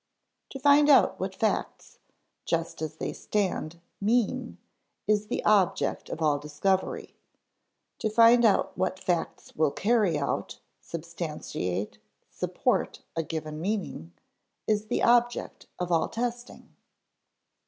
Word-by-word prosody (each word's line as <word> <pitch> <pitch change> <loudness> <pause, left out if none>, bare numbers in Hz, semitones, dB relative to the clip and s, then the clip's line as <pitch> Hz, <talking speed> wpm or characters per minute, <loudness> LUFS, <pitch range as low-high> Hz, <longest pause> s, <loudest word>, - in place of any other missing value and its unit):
8). - - -54
To 270 - -6
find 290 +2 +5
out 280 - +5
what - - -3
facts, - - -2 0.4
just 165 -1 -2
as 155 -1 -4
they - - -4
stand, 185 -5 -2 0.2
mean, 235 +3 0 0.5
is 210 0 +1
the - - -3
object 205 -4 +2
of 165 - -4
all 150 -2 +2
discovery; 150 +6 -1 0.8
to 220 - 0
find 230 +2 +6
out 215 -3 +3
what 185 0 -1
facts 175 -2 -3
will 155 -1 +3
carry 205 -1 +2
out, 140 - -3 0.2
substantiate, 150 - -5 0.3
support - - -1
a 165 - +1
given 155 -1 -5
meaning, 185 - -3 0.5
is 215 0 0
the - - -1
object 240 0 +2
of 180 0 -3
all 165 -2 +2
testing. 240 +1 -5
190 Hz, 120 wpm, -27 LUFS, 160-230 Hz, 0.8 s, find